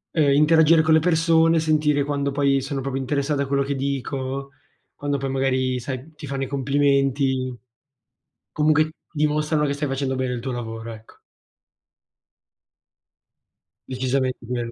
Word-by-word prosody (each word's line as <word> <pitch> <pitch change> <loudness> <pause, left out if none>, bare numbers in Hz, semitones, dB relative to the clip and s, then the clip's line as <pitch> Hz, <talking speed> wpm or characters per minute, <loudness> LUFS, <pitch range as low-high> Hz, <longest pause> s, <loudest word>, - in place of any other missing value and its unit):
Ehm, 145 -3 +3
interagire 160 +1 +5
con 160 0 +3
le 160 - +6
persone, 165 0 +3
sentire 150 -2 +2
quando 140 -1 -1
poi 140 -1 +2
sono 135 0 -4
proprio 135 0 -3
interessate 140 +2 -1
a 140 - -1
quello 140 0 +1
che 140 +1 -2
dico, 135 0 -3 0.4
quando 145 -1 -2
poi 135 0 -3
magari 130 -1 0
sai, 130 +5 -7
ti 150 -1 -10
fanno 135 0 -3
i - - -3
complimenti, 135 -2 +1 0.9
comunque 155 +1 +2 0.2
dimostrano 150 0 +1
che 140 - -1
stai 145 +1 -3
facendo 135 0 -2
bene 130 -1 -1
il 120 - -3
tuo 130 +1 -4
lavoro, 115 -1 -6
ecco. 110 0 -16 2.7
Decisamente 130 0 -1
quello. 120 -1 -3
140 Hz, 145 wpm, -23 LUFS, 130-150 Hz, 2.7 s, le